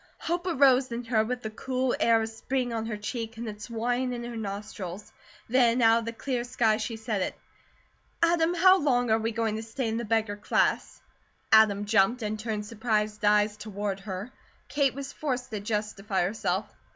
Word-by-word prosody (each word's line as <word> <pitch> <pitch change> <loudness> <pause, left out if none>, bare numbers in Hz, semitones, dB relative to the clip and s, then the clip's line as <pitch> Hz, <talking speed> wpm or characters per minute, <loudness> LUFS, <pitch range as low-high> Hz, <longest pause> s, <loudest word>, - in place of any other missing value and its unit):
Hope 350 +2 -2
arose 265 -5 +4
in 235 +1 -3
her 230 -2 +2
with 245 +2 -4
the 220 - -4
cool 255 +2 -1
air 230 -1 +4
of 220 - -3
spring 245 +2 -2
on 225 -1 -2
her 215 -2 -3
cheek 225 +1 -5
and 230 0 -5
its 210 +1 -7
wine 245 +2 -1
in 240 -1 -5
her 240 0 -6
nostrils. 205 -2 -6 0.3
Then 245 0 +3
out 225 -1 +5
of 230 - -6
the 230 - -3
clear 245 +1 -3
sky 230 -3 +1
she 230 - -3
said 220 -3 -2
it: - - -2 0.8
"Adam, 335 0 +3
how 370 +2 +6
long 245 -5 +2
are 220 - +4
we 225 +1 -1
going 220 -1 -1
to - - -4
stay 230 +3 -4
in 225 0 -1
the 235 - -2
beggar 220 -2 0
class?" 205 - 0 0.5
Adam 210 -2 +5
jumped, 225 +3 +3
and 215 0 -3
turned 215 -2 -3
surprised 215 -1 -1
eyes 210 0 +3
toward 205 -2 -4
her. 195 +4 -6 0.4
Kate 280 -3 +1
was 275 0 -6
forced 255 -4 -3
to 215 - -3
justify 210 -2 -2
herself. 190 0 -1
225 Hz, 190 wpm, -28 LUFS, 210-250 Hz, 0.8 s, how